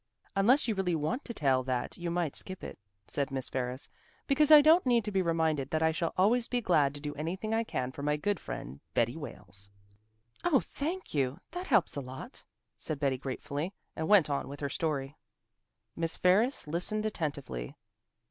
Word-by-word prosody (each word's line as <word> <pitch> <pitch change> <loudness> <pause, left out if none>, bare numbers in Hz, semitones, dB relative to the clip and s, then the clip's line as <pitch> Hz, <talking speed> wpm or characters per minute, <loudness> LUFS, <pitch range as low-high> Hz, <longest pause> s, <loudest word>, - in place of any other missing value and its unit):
"Unless 245 +8 +4
you 225 - +2
really 190 -4 0
want 160 - -1
to - - -4
tell 135 - +2
that 125 -1 -2
you 175 -1 -4
might 170 -4 -1
skip 185 -1 -7
it," - - -7 0.3
said 140 -2 -1
Miss 135 -1 -3
Ferris, 130 0 -3 0.4
"because 290 +2 +3
I 305 -1 +11
don't 315 +4 +6
need 240 -4 +3
to 210 - -2
be 190 -1 +2
reminded 160 -5 +1
that 160 0 0
I 160 - +4
shall 165 +1 -1
always 230 +6 +4
be 245 - 0
glad 150 -10 +3
to - - -6
do 145 0 -4
anything 185 +9 -3
I 225 +1 +2
can 130 - -3
for 140 - -8
my 150 +1 +1
good 200 +4 0
friend 65 +3 -7 0.2
Betty 120 +1 +2
Wales." 100 - -7 0.7
"Oh, 320 -7 +4
thank 345 +6 -4
you! 135 -2 0
That 360 +2 -5
helps 180 - +3
a 140 - -2
lot," 130 0 -8 0.3
said 155 -3 -4
Betty 135 -3 +1
gratefully, 145 +6 -4 0.2
and 160 - -2
went 205 -6 +6
on 140 -1 -1
with 140 +1 -8
her 140 - -1
story. 140 -2 -2 0.8
Miss 165 -1 0
Ferris 210 +9 +3
listened 180 +7 0
attentively. 140 - -3
160 Hz, 190 wpm, -31 LUFS, 140-210 Hz, 0.8 s, I